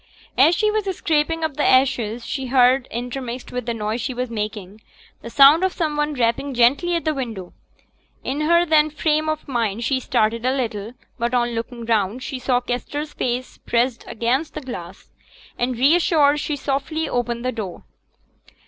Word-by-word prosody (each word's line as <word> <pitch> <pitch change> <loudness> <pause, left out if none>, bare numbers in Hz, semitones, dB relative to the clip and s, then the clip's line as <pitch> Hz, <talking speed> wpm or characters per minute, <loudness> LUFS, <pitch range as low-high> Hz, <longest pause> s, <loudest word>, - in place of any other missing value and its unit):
As 305 +7 +5
she 425 +2 +2
was 430 -1 -1
scraping 325 +1 0
up 310 -3 -2
the 295 - +1
ashes, 240 -3 +2
she 265 -2 -4
heard, 255 0 +4
intermixed 245 +1 -5
with 250 -1 -4
the 235 - 0
noise 220 +2 -2
she 250 +1 -3
was 250 -1 -3
making, 210 -2 -5 0.4
the 235 - -8
sound 280 +7 +7
of 375 - +2
some 310 -4 -1
one 295 0 -1
rapping 250 +3 0
gently 275 +9 +3
at 335 - -2
the 310 - +1
window. 225 -10 -6 0.7
In 280 +3 -2
her 340 +3 +4
then 310 -2 +4
frame 310 +1 0
of 310 0 -3
mind 230 -4 -1
she 260 +2 +1
started 225 -2 0
a 255 +1 +1
little; 220 -3 -3 0.3
but 235 +2 0
on 240 -1 +2
looking 230 +1 -5
round, 225 +2 0
she 265 -3 -5
saw 250 -1 +1
Kester's 290 +5 -4
face 250 +1 -3
pressed 240 0 0
against 255 +7 -1
the - - -4
glass, 190 - -9 0.4
and, 245 0 -2
reassured, 295 +1 +4
she 295 0 -2
softly 285 +3 -2
opened 240 0 -2
the 255 - +1
door. 210 -7 -6
255 Hz, 175 wpm, -21 LUFS, 235-295 Hz, 0.7 s, sound